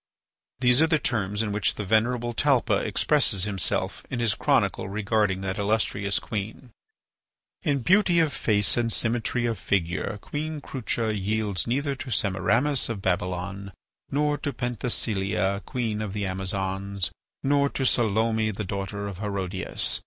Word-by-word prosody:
These 125 +2 +5
are 160 - +5
the 160 -1 +3
terms 105 -6 0
in 105 - -2
which 105 0 +1
the 105 - -4
venerable 120 +3 +1
Talpa 120 -6 +2
expresses 110 -2 +2
himself 100 -3 -1
in 125 - -3
his 115 -3 +3
chronicle 95 - +1
regarding 105 -1 +1
that 95 +1 -3
illustrious 100 -1 +1
queen: 110 +4 -5 0.9
"In 140 -7 0
beauty 190 - +4
of 160 -4 +3
face 105 0 +1
and 115 -1 +1
symmetry 120 +1 0
of 115 -4 -1
figure 95 +2 -1
Queen 155 +4 -4
Crucha 115 -5 -2
yields 105 -1 0
neither 140 +4 0
to 130 - -6
Semiramis 115 +8 +2
of 105 -4 -4
Babylon 90 +2 -2 0.4
nor 150 +1 +1
to 145 - -2
Penthesilea, 100 -6 0
queen 110 -4 -2
of 105 -3 -4
the 105 -1 -2
Amazons; 95 0 -2 0.3
nor 140 0 +3
to 135 - -2
Salome, 110 -2 +2
the 105 0 -4
daughter 100 +1 -4
of 95 -2 -7
Herodias. 95 -3 -1
110 Hz, 145 wpm, -26 LUFS, 100-125 Hz, 0.9 s, These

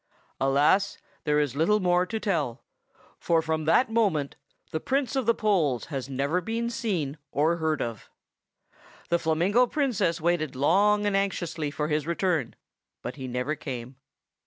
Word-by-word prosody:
Alas! 145 +9 +3 0.3
there 150 -1 +3
is 145 -3 0
little 170 +8 +3
more 180 -1 +2
to 220 +3 -3
tell; 155 - -1 0.6
for 165 -1 +2
from 160 -1 -1
that 225 +9 +3
moment 195 -11 +1 0.4
the 160 - -1
Prince 270 - -1
of 265 -4 0
the 230 - +4
Poles 165 - +1
has 135 -1 -3
never 140 +7 0
been 230 +3 -2
seen 175 - -2
or 160 +4 +2
heard 155 -3 0
of. 115 -3 -6 1.0
The 170 - +2
Flamingo 175 +10 +2
Princess 215 - 0
waited 155 -4 0
long 205 +9 +3
and 205 -1 +1
anxiously 175 -6 -1
for 150 +1 -2
his 150 0 -1
return; 170 -7 0 0.5
but 125 +3 -5
he 130 -2 -5
never 125 +4 -2
came. 130 -4 -6
165 Hz, 155 wpm, -27 LUFS, 145-200 Hz, 1.0 s, the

